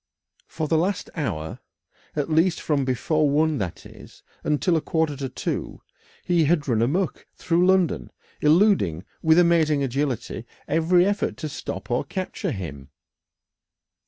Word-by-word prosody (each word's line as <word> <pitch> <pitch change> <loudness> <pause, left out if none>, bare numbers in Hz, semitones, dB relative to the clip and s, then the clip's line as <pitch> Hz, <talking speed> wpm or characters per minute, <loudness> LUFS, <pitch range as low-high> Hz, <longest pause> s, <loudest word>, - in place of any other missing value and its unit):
For 160 -1 -3
the 160 +1 +2
last 190 +3 -1
hour, 95 - -3 0.6
at 145 -2 -1
least 165 +2 +2
from 145 -3 0
before 145 +4 +1
one, 155 0 +2
that 90 -5 -5
is, - - -14 0.2
until 150 +4 +1
a 160 - +1
quarter 160 -2 0
to 135 -1 -4
two, - - -4 0.4
he 170 -3 +2
had 150 -1 +1
run 115 -4 +2
amuck 165 +10 -1
through 175 +1 +2
London, 185 -3 +2 0.3
eluding 150 - +3 0.2
with 160 0 +4
amazing 160 -4 +4
agility 130 -3 -2 0.2
every 165 +4 +3
effort 205 +1 -1
to 155 - -4
stop 140 - -6
or 120 - +1
capture 185 +6 -4
him. 75 - -6
155 Hz, 140 wpm, -24 LUFS, 135-170 Hz, 0.6 s, with